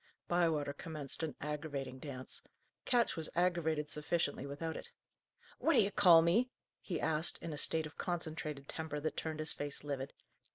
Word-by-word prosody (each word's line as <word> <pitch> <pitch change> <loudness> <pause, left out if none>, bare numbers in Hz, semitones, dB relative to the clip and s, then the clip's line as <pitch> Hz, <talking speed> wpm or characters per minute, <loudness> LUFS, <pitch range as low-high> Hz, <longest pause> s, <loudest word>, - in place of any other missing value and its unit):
Bywater 160 -5 +2
commenced 150 -2 -2
an 160 -2 -2
aggravating 145 -3 -4
dance. 130 -2 -6 0.4
Ketch 240 -2 +3
was 160 -1 -2
aggravated 170 -4 +2
sufficiently 150 -2 -1
without 160 +3 -4
it. - - -7 0.7
"What 330 - +3
d'ye 200 -1 +4
call 170 -5 +8
me?" 220 +10 +3 0.3
he 170 -5 -3
asked, 160 +1 +2
in 165 -2 -5
a - - -5
state 160 -1 +4
of 155 - -10
concentrated 155 -5 -3
temper 160 -2 -4
that 155 +2 -2
turned 155 -1 -3
his 155 0 -1
face 145 -1 -3
livid. 140 -2 -3
155 Hz, 160 wpm, -35 LUFS, 145-170 Hz, 0.7 s, call